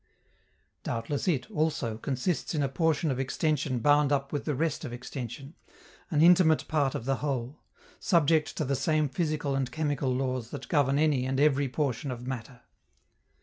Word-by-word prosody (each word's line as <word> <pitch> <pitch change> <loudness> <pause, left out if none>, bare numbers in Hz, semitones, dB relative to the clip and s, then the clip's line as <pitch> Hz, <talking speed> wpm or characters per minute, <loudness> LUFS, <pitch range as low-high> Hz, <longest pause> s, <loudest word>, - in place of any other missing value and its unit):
Doubtless 120 +8 -3
it, 140 -8 +1
also, 140 -8 -1
consists 140 +7 -2
in 150 - +1
a - - +2
portion 160 +1 +1
of 130 - -2
extension 145 0 0
bound 145 +3 +3
up 140 0 0
with 145 - -2
the 150 - -1
rest 160 +3 -1
of 135 - -5
extension, 125 +3 -7 0.6
an 155 -3 +3
intimate 170 -2 +5
part 145 -4 +1
of 115 - -4
the 135 0 0
Whole, 135 -1 -3 0.4
subject 160 -2 +2
to 155 - 0
the 140 +1 0
same 155 +2 +1
physical 150 -2 -1
and 135 -2 -1
chemical 145 -4 -1
laws 130 -2 -2
that - - -8
govern 140 -4 +2
any 145 -4 +2
and 135 0 -1
every 140 -2 +3
portion 135 -1 -2
of 125 -1 -6
matter. 125 -1 -6
140 Hz, 170 wpm, -28 LUFS, 130-155 Hz, 0.6 s, intimate